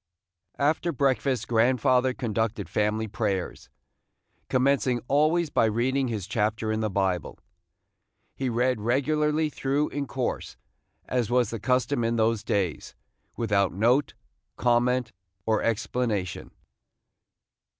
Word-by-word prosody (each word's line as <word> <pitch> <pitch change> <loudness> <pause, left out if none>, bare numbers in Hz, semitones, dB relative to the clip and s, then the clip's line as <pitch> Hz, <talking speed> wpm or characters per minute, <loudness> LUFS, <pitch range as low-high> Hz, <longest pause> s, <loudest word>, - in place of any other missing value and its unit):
After 155 +4 +1
breakfast 130 -3 0
grandfather 125 +2 +3
conducted 110 -5 -2
family 105 +3 0
prayers, 100 -4 -3 0.8
commencing 130 -1 +2
always 155 +3 +2
by - - +3
reading 130 +5 +1
his 110 -6 -3
chapter 110 0 -1
in 110 - -1
the 110 -1 0
Bible. 95 -2 -1 1.0
He 130 -1 -2
read 120 -1 +1
regularly 150 +6 +1
through 140 +2 0
in 140 -1 -4
course, 130 -2 -3 0.5
as 125 -4 -1
was 120 -3 +2
the 115 - -4
custom 125 +2 +1
in 115 +1 0
those 110 -1 +1
days, 95 -7 -2 0.4
without 100 -4 +1
note, 120 +7 +2 0.4
comment, 120 0 +2 0.3
or 110 -1 +1
explanation. 110 -4 -2
120 Hz, 110 wpm, -26 LUFS, 110-130 Hz, 1.0 s, grandfather